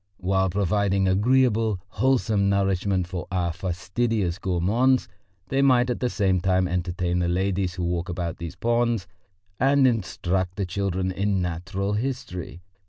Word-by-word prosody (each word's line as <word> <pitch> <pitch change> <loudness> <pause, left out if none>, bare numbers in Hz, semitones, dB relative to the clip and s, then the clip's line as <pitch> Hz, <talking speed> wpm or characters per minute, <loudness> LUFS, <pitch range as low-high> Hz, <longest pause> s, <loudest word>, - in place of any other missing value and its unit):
While 95 0 +1
providing 100 0 +1
agreeable, 110 0 +2
wholesome 110 -3 +1
nourishment 95 -1 +1
for 90 -1 -5
our 90 -3 0
fastidious 95 +2 -2
gourmands, 110 +9 +2 0.4
they 135 0 +1
might 125 -2 +4
at - - -3
the 125 - 0
same 95 -5 +1
time 95 0 +2
entertain 90 0 -1
the 90 - +1
ladies 95 0 0
who 90 - -3
walk 85 +1 -2
about 85 -1 -3
these 85 -2 -7
ponds 120 -3 0 0.5
and 135 +1 +4
instruct 95 -5 0
the 100 -1 -2
children 95 0 -1
in 100 +1 0
natural 90 +3 -2
history. 105 -8 -4
95 Hz, 140 wpm, -25 LUFS, 90-110 Hz, 0.5 s, might